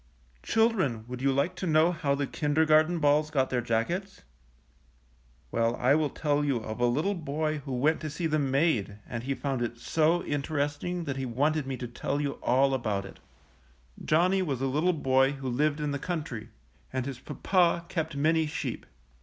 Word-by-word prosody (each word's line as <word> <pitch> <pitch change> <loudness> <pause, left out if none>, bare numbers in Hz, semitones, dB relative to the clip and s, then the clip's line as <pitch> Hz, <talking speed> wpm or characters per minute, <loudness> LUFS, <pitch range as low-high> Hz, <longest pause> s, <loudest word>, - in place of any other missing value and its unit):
Children, 185 - +1
would 125 0 -6
you 135 0 +3
like 140 +7 +1
to 185 - -3
know 160 +2 +4
how 150 -5 0
the 140 0 -1
kindergarten 155 +3 +2
balls 150 0 +3
got 135 -4 0
their 125 -1 +1
jackets? 170 - -2 1.3
Well, 115 +1 +1
I 125 +3 +3
will 150 -1 +2
tell 145 +1 0
you 140 -4 +1
of 110 0 -6
a 120 - +3
little 150 +12 +1
boy 155 -2 -2
who 135 - -4
went 150 +6 +2
to 155 - -3
see 160 +4 -4
them 150 -3 +1
made 130 - +1
and 120 -2 -5
he 135 +3 -2
found 135 -3 -2
it 120 0 -3
so 160 +7 +2
in 145 -1 -2
teresting 145 +5 -2
that 140 -4 -4
he 135 -1 -3
wanted 145 +4 0
me 135 -1 -3
to 125 - -5
tell 135 +4 -3
you 140 -1 -2
all 135 +2 +3
about 105 -6 -1
it. - - -12 0.8
Johnny 180 +5 +3
was 140 -9 -2
a 135 - -1
little 150 +7 +1
boy 135 -2 +2
who 135 -1 -6
lived 145 +4 +1
in 150 -1 -1
the 140 - -2
country, 145 -10 -4 0.4
and 130 -1 -2
his 135 -2 -5
papa 175 -2 +1
kept 160 -3 -3
many 160 +2 +2
sheep. 150 - -4
145 Hz, 190 wpm, -28 LUFS, 130-160 Hz, 1.3 s, know